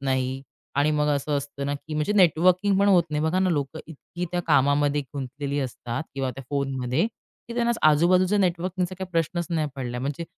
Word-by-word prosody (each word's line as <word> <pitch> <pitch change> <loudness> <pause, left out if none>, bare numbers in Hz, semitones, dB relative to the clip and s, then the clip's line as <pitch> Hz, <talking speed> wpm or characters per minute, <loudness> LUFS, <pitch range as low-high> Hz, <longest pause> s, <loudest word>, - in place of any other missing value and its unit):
नाही 130 -1 -1 0.3
आणि 145 +2 +3
मग 150 0 +1
असं 145 +1 -2
असतं 140 0 -5
ना, 145 - -1
की 155 +2 -7
म्हणजे 150 +7 0
नेटवर्किंग 185 +2 +4
पण 200 - +4
होत 185 -3 +6
नाही 150 0 -1
बघा 160 +4 +1
ना 185 -1 +2
लोक 145 -1 -2
इतकी 165 +3 -7
त्या 175 - 0
कामामध्ये 145 0 +3
गुंतलेली 140 +1 -4
असतात 125 0 -4
किंवा 135 -1 -1
त्या 135 +1 -9
फोनमध्ये, 135 - 0 0.4
की 235 - -6
त्यांना 235 0 +2 0.2
आजूबाजूचे 180 +6 +4
नेटवर्किंगचा 180 0 0
काही 190 -1 -6
प्रश्नच 170 +1 0
नाही 155 -3 0
पडलाय, 125 -2 -4
म्हणजे 145 +5 -3
150 Hz, 185 wpm, -25 LUFS, 140-180 Hz, 0.4 s, होत